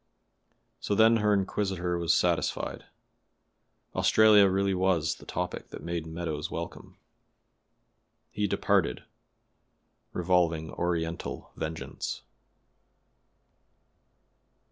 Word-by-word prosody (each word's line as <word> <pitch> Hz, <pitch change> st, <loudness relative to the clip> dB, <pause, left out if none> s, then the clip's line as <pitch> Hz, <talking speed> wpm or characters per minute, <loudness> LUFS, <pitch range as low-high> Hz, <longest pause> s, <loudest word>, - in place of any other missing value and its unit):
So 100 Hz, -, -1 dB
then 110 Hz, +2 st, +6 dB
her 105 Hz, -1 st, +2 dB
inquisitor 95 Hz, -3 st, 0 dB
was 85 Hz, -2 st, +1 dB
satisfied; -, -, 0 dB, 1.1 s
Australia 105 Hz, -2 st, +6 dB
really 95 Hz, +1 st, +1 dB
was 90 Hz, -4 st, +1 dB
the -, -, -15 dB
topic 90 Hz, 0 st, -4 dB
that -, -, -9 dB
made 85 Hz, -1 st, -3 dB
Meadows 80 Hz, -2 st, -4 dB
welcome. -, -, -7 dB, 1.3 s
He 105 Hz, 0 st, -1 dB
departed, 60 Hz, -, +1 dB, 1.1 s
revolving 85 Hz, -3 st, +1 dB
Oriental 85 Hz, -1 st, -3 dB
vengeance. 80 Hz, 0 st, -5 dB
90 Hz, 80 wpm, -28 LUFS, 80-100 Hz, 1.3 s, then